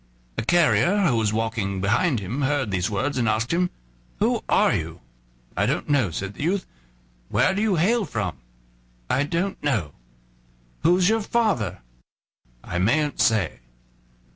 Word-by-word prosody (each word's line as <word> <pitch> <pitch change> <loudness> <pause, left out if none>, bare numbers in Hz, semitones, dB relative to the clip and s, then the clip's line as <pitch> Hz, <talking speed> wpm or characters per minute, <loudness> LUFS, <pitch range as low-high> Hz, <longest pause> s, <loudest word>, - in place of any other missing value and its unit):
A - - -2
carrier 175 - +3
who 135 -8 +3
was 110 -2 +1
walking 110 -3 -2
behind 110 - +1
him 110 +9 -4
heard 135 -5 0
these 90 -2 0
words, 130 +7 -1
and 115 -2 +2
asked 110 +6 0
him: 180 +1 +1 0.5
"Who - - +1
are - - +4
you" - - -4 0.5
"I 100 +4 +1
don't 140 +3 -2
know," 135 -9 +2
said 95 +5 -5
the - - -10
youth. 185 +5 0 0.6
"Where 185 - +2
do 200 - -1
you 215 -3 +2
hail 205 +7 +2
from?" 95 - -3 0.7
"I 135 - +2
don't 180 +5 -2
know." 110 - 0 0.9
"Who's 180 +3 +4
your 225 +1 +2
father?" 205 - 0 0.8
"I 85 - -3
mayn't 145 +10 +1
say." 110 - +2
130 Hz, 150 wpm, -24 LUFS, -, 0.9 s, are